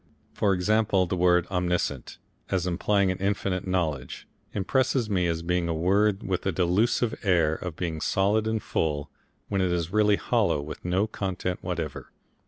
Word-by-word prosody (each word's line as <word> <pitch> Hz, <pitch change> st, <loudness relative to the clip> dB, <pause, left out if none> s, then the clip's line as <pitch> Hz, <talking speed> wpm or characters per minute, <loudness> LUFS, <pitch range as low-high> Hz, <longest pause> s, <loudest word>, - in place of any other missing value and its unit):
For 100 Hz, -2 st, +2 dB
example, 100 Hz, 0 st, +2 dB
that 90 Hz, -, -2 dB
word 90 Hz, -1 st, +3 dB
Omniscient, 90 Hz, -7 st, -1 dB, 0.3 s
as 95 Hz, -2 st, 0 dB
implying 95 Hz, +2 st, +1 dB
infinite 95 Hz, -1 st, -1 dB
knowledge, 80 Hz, -8 st, -2 dB, 0.2 s
impresses 120 Hz, +2 st, 0 dB
me 90 Hz, -3 st, +2 dB
as 85 Hz, -1 st, -2 dB
being 90 Hz, 0 st, 0 dB
a 85 Hz, -, 0 dB
word 100 Hz, +4 st, +2 dB
with 95 Hz, -2 st, -2 dB
a -, -, +2 dB
delusive 95 Hz, +7 st, +1 dB
air 85 Hz, -6 st, +3 dB
of 85 Hz, 0 st, -5 dB
being 80 Hz, -3 st, -3 dB
solid 105 Hz, +3 st, +1 dB
and 110 Hz, -1 st, -1 dB
full, 75 Hz, -2 st, -2 dB, 0.4 s
when 100 Hz, -2 st, 0 dB
it 90 Hz, -1 st, +1 dB
is 85 Hz, 0 st, -2 dB
really 105 Hz, -1 st, +4 dB
hollow 75 Hz, -, +1 dB
with 75 Hz, +2 st, -7 dB
no 90 Hz, +4 st, +1 dB
content 95 Hz, -4 st, -3 dB
whatever. 85 Hz, -5 st, -4 dB
90 Hz, 160 wpm, -26 LUFS, 85-100 Hz, 0.4 s, really